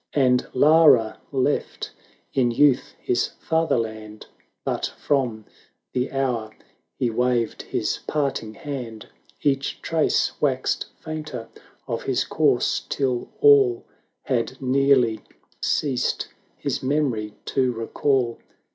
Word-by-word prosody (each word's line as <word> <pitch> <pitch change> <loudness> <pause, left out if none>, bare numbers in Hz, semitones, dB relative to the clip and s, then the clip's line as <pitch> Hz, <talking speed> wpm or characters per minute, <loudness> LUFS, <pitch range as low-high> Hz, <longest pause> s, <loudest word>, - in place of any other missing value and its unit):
And 125 -3 +3
Lara 145 -6 +5
left 140 +1 -1 0.4
in 130 -3 +3
youth 130 +2 +3
his 120 - 0
father 160 -3 +1
land; 110 -2 -5 0.4
But - - -1
from 120 -7 0 0.5
the 125 +1 -1
hour 125 -5 -1 0.5
he 120 -2 0
waved 120 -1 0
his - - -2
parting 135 -7 -1
hand 125 -6 -6 0.3
Each 135 -2 0
trace 160 -1 +1
waxed 130 -3 0
fainter 155 -7 -6 0.4
of - - -2
his - - 0
course, - - +1
till 130 -3 -1
all 135 -5 +5 0.4
Had 130 +1 -1
nearly 130 -3 +3 0.4
ceased 135 -5 0 0.3
his - - -2
memory 130 -7 -1
to 130 -2 +1
recall. 120 +1 0
130 Hz, 105 wpm, -24 LUFS, 115-140 Hz, 0.5 s, Lara